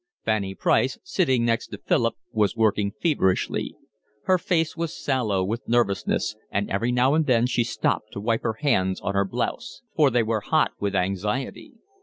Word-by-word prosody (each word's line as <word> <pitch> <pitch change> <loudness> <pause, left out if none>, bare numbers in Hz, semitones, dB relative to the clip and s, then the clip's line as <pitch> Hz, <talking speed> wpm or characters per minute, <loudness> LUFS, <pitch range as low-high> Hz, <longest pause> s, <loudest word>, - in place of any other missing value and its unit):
Fanny 100 -3 0
Price, 130 +6 +2
sitting 130 -10 +1
next 115 -1 0
to - - -8
Philip, - - +1 0.2
was 105 -1 +1
working 105 -3 +2
feverishly. 135 - +1 0.5
Her 185 -1 +3
face 165 -2 0
was 165 -1 -4
sallow 105 -8 0
with 110 +5 -4
nervousness, 110 -1 +1
and 100 0 -1
every 115 +5 0
now 125 +3 +3
and 155 0 +2
then 120 -2 +3
she 125 -1 +1
stopped 110 -2 -1
to - - -5
wipe 115 +2 0
her 110 -1 -2
hands 95 -10 +1
on 100 - -2
her 100 0 +2
blouse; 75 -9 -4
for 150 -3 +5
they 120 -2 +2
were 110 -1 -1
hot - - +2
with 100 -1 -1
anxiety. 105 - -2
115 Hz, 175 wpm, -24 LUFS, 100-130 Hz, 0.5 s, for